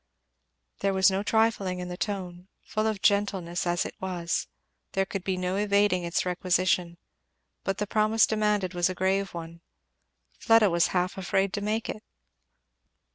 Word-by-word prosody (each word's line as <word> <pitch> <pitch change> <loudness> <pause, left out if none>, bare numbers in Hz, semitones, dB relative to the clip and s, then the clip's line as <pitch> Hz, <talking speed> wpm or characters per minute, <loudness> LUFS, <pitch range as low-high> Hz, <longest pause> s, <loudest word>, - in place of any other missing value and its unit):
There 195 -1 0
was 190 +1 +5
no 190 +1 0
trifling 210 -4 +1
in 180 0 -5
the 180 - -5
tone, 180 -2 -4 0.2
full 215 0 -1
of 215 -3 -3
gentleness 190 -4 +1
as 175 +1 +1
it - - -6
was; 175 -2 -2 0.5
there 195 0 +1
could 190 -1 -5
be 190 -1 -1
no 185 +1 -1
evading 200 -3 +2
its 170 +1 -1
requisition. 180 -1 0 0.7
But 195 - -1
the 210 - -1
promise 215 +1 +3
demanded 210 -3 0
was 175 0 +1
a 185 - -4
grave 190 +1 0
one. 170 0 -8 0.8
Fleda 225 -4 +5
was 170 -1 +3
half 180 +2 -1
afraid 195 +1 0
to 205 - -2
make 215 +2 -1
it. 215 - -5
190 Hz, 160 wpm, -27 LUFS, 180-205 Hz, 0.8 s, was